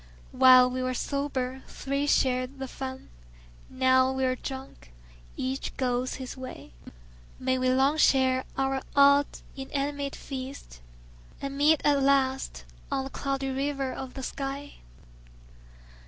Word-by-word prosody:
While 255 -1 +7
we 255 0 -2
were 255 0 -1
sober, 265 -2 -2
three 275 +1 -2
shared 255 -1 +1
the 265 0 -5
fun; 260 0 -7 0.6
Now 260 0 +3
we 265 0 0
are 255 0 +1
drunk, 265 - -8 0.5
each 260 +1 -3
goes 250 -1 -1
his 260 -1 -7
way. 255 - -9 0.6
May 260 0 0
we 255 0 +2
long 270 +4 +3
share 260 -3 +3
our 270 0 0
odd, 280 0 +6 0.3
inanimate 280 +1 -3
feast, 260 - -8 0.6
And 275 0 -5
meet 295 +2 +4
at 285 -1 +3
last 270 -1 +1 0.3
on 270 -1 0
the 270 - -6
Cloudy 275 -1 -2
River 275 0 -2
of 260 -1 -7
the 265 - -6
sky. 275 +2 -5
265 Hz, 130 wpm, -28 LUFS, 255-275 Hz, 0.6 s, While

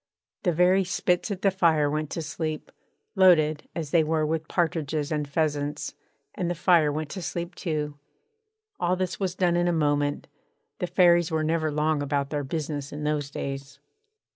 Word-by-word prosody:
The 180 - +2
very 180 +3 +4
spits 180 +1 0
at 195 -2 -4
the 195 - +4
fire 165 -5 +3
went 155 +1 -2
to 165 - -4
sleep, 155 0 -4 0.4
loaded 155 -6 +4
as 155 -4 -4
they 165 -2 +4
were 155 0 +1
with 160 0 -2
partridges 160 -3 -1
and 150 -2 -1
pheasants; 145 -1 -1 0.4
and 175 - -2
the 175 - -1
fire 165 -3 +4
went 155 0 -4
to 190 - -5
sleep 170 +1 -4
too. 150 -5 -3 0.8
All 175 +1 +1
this 185 -1 -3
was 185 -2 -1
done 180 -2 +2
in 175 0 +2
a - - +3
moment: 145 -3 0 0.5
the 180 - -1
Fairies 175 -1 +4
were 160 -1 0
never 160 0 +1
long 150 0 +1
about 140 -1 -1
their 145 -1 -1
business 145 -1 -4
in 150 +1 -6
those 150 -1 -1
days. 140 0 -6
155 Hz, 175 wpm, -26 LUFS, 150-175 Hz, 0.8 s, very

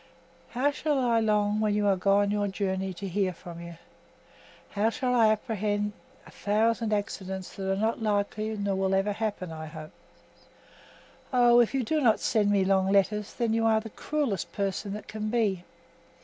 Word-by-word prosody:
How 285 +3 +3
shall 295 0 -1
I 240 -3 +2
long 210 -1 +1
when 210 -1 +1
you 210 0 +1
are 200 -1 +4
gone 200 +2 +2
your 205 0 0
journey 190 -1 -2
to 190 +2 -6
hear 190 0 0
from 170 -1 -10
you! 170 0 -9 1.0
how 210 +2 +1
shall 255 0 -1
I 230 -3 +5
apprehend 210 -2 -1 0.3
a - - -14
thousand 220 +2 0
accidents 190 -2 -3
that 190 -1 -2
are - - +1
not 220 +4 -1
likely 215 +1 -1
nor 200 -1 -1
will 190 0 +1
ever 195 +2 +1
happen, 205 -5 -3
I 155 0 -7
hope! 155 -1 -9 1.4
Oh, 240 -2 +5
if 240 +2 +3
you 265 - +1
do 310 +6 0
not 225 -5 +4
send 210 -2 +1
me 200 -2 +3
long 190 0 +2
letters, 205 +1 +1
then 230 -2 0
you 225 0 +1
are 220 -1 +4
the 220 0 -9
cruellest 285 -9 -2
person 200 0 -2
that 210 - -7
can 215 0 -4
be! 205 -6 0
210 Hz, 180 wpm, -28 LUFS, 195-225 Hz, 1.4 s, I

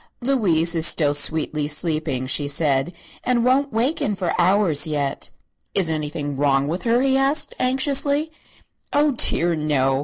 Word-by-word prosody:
"Louise 185 -11 +1
is 165 -1 +3
still 145 -3 +2
sweetly 150 0 -1
sleeping," 155 -4 -1
she 145 +2 0
said, 140 0 0 0.3
"and 245 -1 +1
won't 275 +2 +2
waken 230 -2 0
for 185 -3 -2
hours 175 -5 +2
yet." 145 -3 -3 0.5
"Is 180 -5 +1
anything 150 -2 -4
wrong 140 -1 +1
with 170 +5 -3
her?" 240 +2 +2
he 270 -1 +2
asked, 275 +3 0
anxiously. 280 +4 0 0.6
"Oh, 295 +1 +3
dear, 175 -8 +1
no! 135 -3 0
165 Hz, 145 wpm, -21 LUFS, -, 0.6 s, is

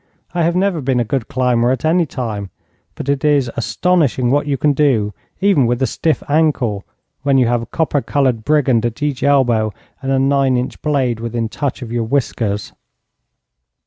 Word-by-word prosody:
I 175 - 0
have 170 +1 +1
never 185 -3 +1
been 130 -2 0
a - - +2
good 120 +1 -2
climber 125 -2 +1
at 130 +4 -1
any 165 +1 +2
time, 110 -8 -4 0.5
but - - -7
it 140 0 0
is 145 -5 +2
astonishing 135 -2 +1
what 145 +1 +1
you 140 -2 0
can 145 +2 +2
do, 125 -8 +1 0.3
even 185 -11 +3
with 120 +1 0
a 130 - +2
stiff 160 +4 -1
ankle, 140 -9 +1 0.4
when 140 -1 +2
you 130 - +4
have 120 0 +1
a 115 - -8
copper 155 -3 0
coloured 130 -7 0
brigand 130 -5 +2
at 120 +4 -3
each 145 -3 -1
elbow 120 -6 +2 0.3
and 135 0 -2
a 135 - +2
nine 135 -1 +2
inch 125 +1 -4
blade 130 -6 0
within 115 -1 -3
touch 135 +1 -3
of 115 - -8
your 120 -1 -1
whiskers. 110 -5 -1
130 Hz, 185 wpm, -17 LUFS, 120-145 Hz, 0.5 s, you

